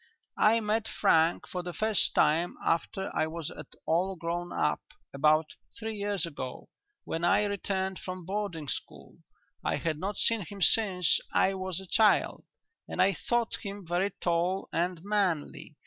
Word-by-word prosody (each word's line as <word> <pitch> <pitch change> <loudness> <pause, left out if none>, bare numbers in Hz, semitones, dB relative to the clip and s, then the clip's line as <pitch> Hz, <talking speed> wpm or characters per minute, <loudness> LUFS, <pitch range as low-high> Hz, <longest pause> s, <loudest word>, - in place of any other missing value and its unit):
"I 220 +2 +5
met 215 +1 0
Frank 165 -4 +3
for 180 - -4
the 175 0 -6
first 215 -1 +1
time 165 +4 +3
after 190 +3 -1
I 155 - +2
was 165 -1 -5
at 150 - -9 0.2
all 180 +4 +1
grown 175 +1 -3
up - - 0 0.3
about 155 +3 +3 0.3
three 225 0 -4
years 200 -3 -1
ago, 140 -6 -7 0.3
when 165 - -4
I 175 +4 +4
returned 190 -2 -2
from 185 -2 -6
boarding 190 -5 -3
school. - - -6 0.4
I - - +1
had 155 -2 -2
not 200 +4 -3
seen 230 -2 +2
him 200 +3 -8
since 190 -4 +4
I 195 - +3
was 185 -2 -2
a 190 - -9
child, 215 +3 +3 0.4
and - - -6
I 190 +2 +5
thought 240 +2 0
him 200 -2 -7
very 175 +4 +1
tall 180 +1 -1
and 175 0 -1
manly. 190 -7 -1
185 Hz, 160 wpm, -29 LUFS, 165-200 Hz, 0.4 s, I